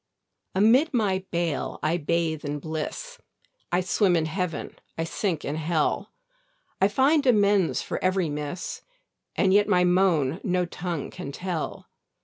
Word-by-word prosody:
Amid 250 - +4
my 190 -5 +1
bale 170 -4 -2
I 160 +3 +2
bathe 160 -1 -1
in 145 0 -3
bliss, 160 - -5 0.5
I 175 - +2
swim 185 0 +2
in 160 -2 +1
Heaven, 165 -1 -3 0.2
I 165 - 0
sink 165 -1 -2
in 145 +2 -2
hell: 165 +6 0 0.7
I 195 - +6
find 270 +8 +3
amends 205 -6 +3
for - - -4
every 185 -1 +2
miss, 150 +3 -5 0.5
And 190 -1 +3
yet 205 +1 +5
my 180 0 +4
moan 180 -4 +2
no 180 -3 +1
tongue 175 -3 -4
can 140 - -7
tell. 175 +1 -4
180 Hz, 140 wpm, -26 LUFS, 160-200 Hz, 0.7 s, I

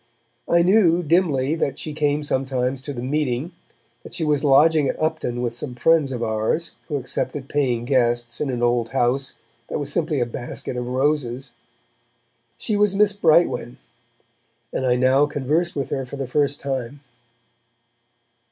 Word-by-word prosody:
I 170 0 +4
knew, 180 -3 +4
dimly, 155 -4 +2
that 160 -4 -1
she 155 - -6
came 150 0 0
sometimes 130 -2 -1
to 145 - -6
the 120 -3 -5
meeting, 140 +2 -1 0.5
that - - -9
she 165 - -2
was 150 -2 +1
lodging 150 +1 +5
at - - -3
Upton 155 -6 -1
with 120 -1 -1
some 125 +1 -6
friends 155 +2 +3
of 120 -2 -3
ours 110 +10 -1
who 150 - -3
accepted 135 +1 -3
paying 125 -5 0
guests 120 -2 +1
in 150 - -1
an 120 -2 -2
old 120 -1 +1
house 135 +2 0 0.3
that - - -3
was 145 -1 -4
simply 155 -4 0
a 120 - +2
basket 120 +1 -6
of 125 0 -3
roses. 130 -1 -1 1.1
She 215 - -2
was 205 -1 +2
Miss 205 0 +3
Brightwen, 170 - +2 1.0
and 130 - -1
I 125 - +3
now 130 +3 +3
conversed 150 +5 -1
with 140 -2 -3
her 135 - -1
for 130 +2 -8
the 135 -1 -3
first 145 +2 0
time. 135 0 -4
140 Hz, 160 wpm, -22 LUFS, 125-155 Hz, 1.1 s, lodging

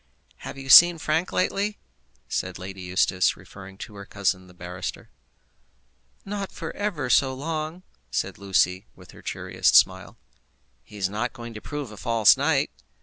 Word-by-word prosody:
"Have - - -9
you 135 0 -9
seen 175 +5 +9
Frank, 160 +3 -1
lately?" 200 +3 0 0.5
said - - -3
Lady 95 +1 -8
Eustace, 90 0 +1
referring 95 0 -13
to 105 - -9
her 100 - -9
cousin 95 -2 -1
the 90 - -16
barrister. 90 0 -7 1.1
"Not 200 -1 -4
for 165 - -7
ever 185 -11 -2
so 130 +3 +3
long," 155 +4 -4 0.3
said - - -3
Lucy, 95 0 +1
with - - -15
her - - -15
cheeriest - - 0
smile. - - +4 0.6
"He 105 +10 -14
is 95 -2 0
not 110 +5 -3
going 120 -2 -9
to 110 - -9
prove 145 -3 -6
a 105 - -11
false 115 -2 +5
knight?" - - +1
115 Hz, 155 wpm, -25 LUFS, 95-155 Hz, 1.1 s, seen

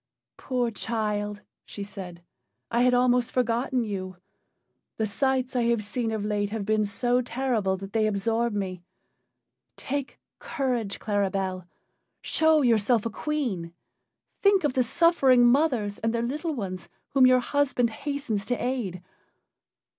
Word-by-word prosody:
"Poor 245 -3 -1
child!" 210 -2 -2 0.2
she 205 - -7
said, 185 -4 -9 0.5
"I 235 +1 +2
had 250 0 +4
almost 250 0 +3
forgotten 245 +1 0
you. 185 -4 -5 0.8
The 220 - +1
sights 260 +4 0
I 240 -2 +2
have 235 -2 +1
seen 230 +2 -2
of 215 -2 -2
late 205 -1 -1
have 215 -1 -4
been 215 0 +2
so 245 +4 +1
terrible 235 -6 -1
that 195 +1 -9
they 220 -1 +2
absorb 225 +3 0
me. 190 -3 -3 1.0
Take 280 0 -4 0.2
courage, 250 -9 -2
Claribel! 195 -3 -1 0.6
Show 315 -2 +3
yourself 230 -1 +3
a 230 - -2
queen. 210 - -3 0.7
Think 400 -2 +4
of 290 -3 +1
the 255 - +2
suffering 265 -3 +4
mothers 240 -6 +2
and 225 +1 -1
their 235 - 0
little 300 +6 -2
ones 185 -6 -5 0.2
whom 260 -1 +5
your 255 0 +6
husband 250 -2 +1
hastens 275 -4 -3
to 245 - 0
aid. 230 -9 -3
235 Hz, 140 wpm, -26 LUFS, 205-255 Hz, 1.0 s, your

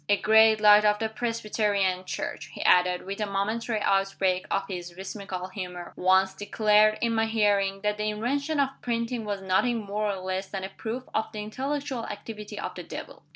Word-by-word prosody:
A 205 - +5
great 220 +1 +5
light 210 0 +7
of 210 0 +4
the 220 +1 -2
Presbyterian 210 -5 -1
Church," - - -4
he - - -5
added, 180 0 +4
with 195 +2 -5
a 210 - 0
momentary 215 +3 -1
outbreak 195 -2 +1
of 195 - 0
his 175 -2 -6
whimsical 190 -1 -6
humor, 180 -2 -7
"once 190 +1 +3
declared, 210 +1 +3
in 230 -1 +1
my 225 0 +2
hearing, 200 -3 +1
that 210 0 -1
the 215 0 0
invention 280 +8 -1
of 275 -1 +3
printing 235 -1 -2
was 200 -2 -3
nothing 210 +6 +2
more 210 +1 -1
or - - -3
less 185 +1 -3
than 190 -1 -5
a 190 - -4
proof 230 +5 -5
of 220 - +1
the 210 -1 -5
intellectual 270 +2 -3
activity 210 0 -7
of - - -4
the - - -7
Devil. - - -9
210 Hz, 190 wpm, -27 LUFS, 195-225 Hz, -, light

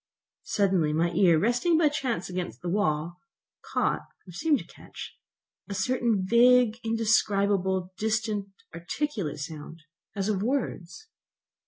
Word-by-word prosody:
Suddenly 185 -7 +1
my 170 +2 +1
ear, 170 -1 +4
resting 245 - +2
by 320 -2 +4
chance 260 - -2
against 180 -1 -5
the 175 - -2
wall, 170 -2 -1 0.5
caught, - - +1 0.3
or - - -10
seemed 295 - +1
to - - -8
catch, - - -11 0.6
certain 210 0 0
vague, 240 +1 +5
indescribable, 200 -4 +1
distant, 220 -2 -1 0.3
articulate 175 - -3
sounds, 155 +2 -8 0.3
as 195 -1 -1
of 205 -3 0
words. 245 - -3
200 Hz, 120 wpm, -27 LUFS, 175-235 Hz, 0.6 s, vague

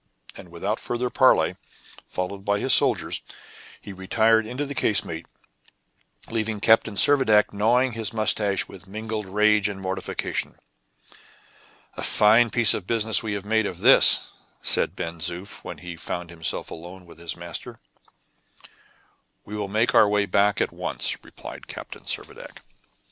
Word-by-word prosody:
And 90 - -12
without 95 +6 -4
further 120 +1 -3
parley, - - +3 0.5
followed 95 +2 -5
by 100 0 0
his 130 - +5
soldiers, - - +3 0.6
he 100 - -10
retired 110 +4 +1
into 130 +5 -4
the 140 - -6
casemate, 85 -10 -1 1.0
leaving 110 -2 -2
Captain 110 0 +3
Servadac 110 -4 +3
gnawing 120 +5 +2
his 115 -2 -4
mustache 110 -3 +1
with 95 0 -13
mingled 110 0 -5
rage 105 +1 +2
and 100 -1 -7
mortification. 95 0 -4 1.4
"A - - -5
fine 115 +3 +4
piece 115 0 +5
of 95 - -5
business 110 -1 +2
we 110 -2 -4
have 100 -1 -5
made 110 0 +1
of 90 - -7
this!" - - +6 0.4
said - - +3
Ben 85 0 -6
Zoof, 90 +4 -4
when - - -8
he 90 -1 -9
found 85 +1 -6
himself 80 -1 -2
alone 90 +2 -11
with 85 - -16
his 85 -2 -4
master. 85 -1 -8 1.7
"We 105 - -8
will 105 -1 -4
make 110 +4 0
our 105 - +5
way 105 0 +1
back 100 +1 +1
at - - -1
once," - - -2
replied - - -12
Captain - - -10
Servadac. - - -6
105 Hz, 145 wpm, -23 LUFS, 95-110 Hz, 1.7 s, this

